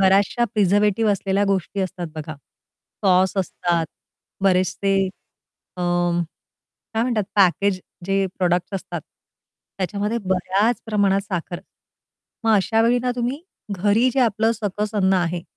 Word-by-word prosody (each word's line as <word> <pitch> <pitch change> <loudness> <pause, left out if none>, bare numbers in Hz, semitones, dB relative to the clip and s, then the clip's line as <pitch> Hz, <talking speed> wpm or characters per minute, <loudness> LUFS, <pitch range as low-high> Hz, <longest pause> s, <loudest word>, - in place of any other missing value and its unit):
बऱ्याचशा 195 +5 +3
प्रिझर्व्हेटिव्ह 210 +1 +3
असलेल्या 195 0 0
गोष्टी 195 0 -1
असतात 185 -2 -3
बघा. 155 0 -6 0.7
सॉस 185 0 +3
असतात 175 -3 0 0.6
बरेचसे 195 +1 +2 0.7
अ, - - -6 1.1
काय 225 - +2
म्हणतात 235 -4 0
पॅकेज 195 -1 +3 0.3
जे 195 0 +1
प्रॉडक्ट्स 180 +1 +1
असतात 190 - -4 0.8
त्याच्यामध्ये 205 +4 -1
बऱ्याच 190 +5 +1
प्रमाणात 200 -3 +2
साखर 180 -3 -4 0.8
मग 225 - +3
अशावेळी 225 +4 +3
ना 250 +1 -1
तुम्ही 250 +5 -2 0.3
घरी 205 +6 +3
जे 270 - +3
आपलं 225 -1 +2
सकस 210 -1 -3
अन्न 190 -2 +3
आहे 175 -1 0
195 Hz, 115 wpm, -22 LUFS, 185-215 Hz, 1.1 s, बऱ्याचशा